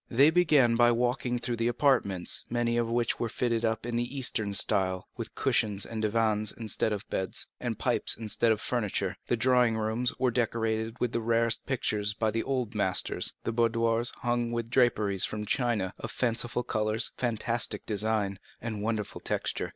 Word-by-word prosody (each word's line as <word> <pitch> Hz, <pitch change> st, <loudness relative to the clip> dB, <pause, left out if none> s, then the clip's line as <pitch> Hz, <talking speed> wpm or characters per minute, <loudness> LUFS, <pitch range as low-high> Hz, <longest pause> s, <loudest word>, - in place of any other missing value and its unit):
They 140 Hz, +6 st, +5 dB
began 155 Hz, -8 st, +4 dB
by 120 Hz, +1 st, +5 dB
walking 125 Hz, +1 st, 0 dB
through 120 Hz, 0 st, -3 dB
the 115 Hz, +1 st, 0 dB
apartments, 120 Hz, -8 st, +1 dB
many 120 Hz, 0 st, 0 dB
of 120 Hz, -1 st, 0 dB
which 120 Hz, 0 st, 0 dB
were 120 Hz, -, -1 dB
fitted 115 Hz, 0 st, -1 dB
up 110 Hz, 0 st, -1 dB
in 120 Hz, -1 st, -2 dB
the 120 Hz, +3 st, -3 dB
Eastern 110 Hz, -6 st, +1 dB
style, 95 Hz, -3 st, +1 dB
with -, -, -7 dB
cushions 100 Hz, -2 st, +1 dB
and 110 Hz, -1 st, -5 dB
divans 110 Hz, -1 st, +1 dB
instead 110 Hz, -1 st, -2 dB
of 105 Hz, -1 st, -4 dB
beds, 95 Hz, -, -1 dB
and -, -, -3 dB
pipes -, -, +1 dB
instead 115 Hz, +1 st, +2 dB
of 110 Hz, -, +1 dB
furniture. 105 Hz, -6 st, -2 dB
The 120 Hz, -, +1 dB
drawing 125 Hz, -1 st, +3 dB
rooms 110 Hz, +3 st, 0 dB
were 130 Hz, -1 st, +1 dB
decorated 115 Hz, -1 st, -1 dB
with 125 Hz, -, 0 dB
the 115 Hz, -, -1 dB
rarest 115 Hz, 0 st, +1 dB
pictures 105 Hz, -6 st, -1 dB
by 110 Hz, 0 st, 0 dB
the 115 Hz, +1 st, -1 dB
old 125 Hz, -4 st, -2 dB
masters, 95 Hz, -4 st, 0 dB
the -, -, -1 dB
boudoirs 115 Hz, 0 st, +1 dB
hung 120 Hz, -1 st, 0 dB
with 115 Hz, -1 st, -3 dB
draperies 110 Hz, -7 st, +3 dB
from 105 Hz, 0 st, -2 dB
China, 110 Hz, -5 st, 0 dB
of -, -, -5 dB
fanciful 120 Hz, 0 st, -1 dB
colors, 110 Hz, +1 st, +1 dB
fantastic 120 Hz, 0 st, -1 dB
design, 105 Hz, -2 st, -1 dB, 0.2 s
and 110 Hz, -3 st, -5 dB
wonderful 110 Hz, -1 st, -3 dB
texture. -, -, -2 dB
115 Hz, 175 wpm, -29 LUFS, 110-120 Hz, 0.2 s, They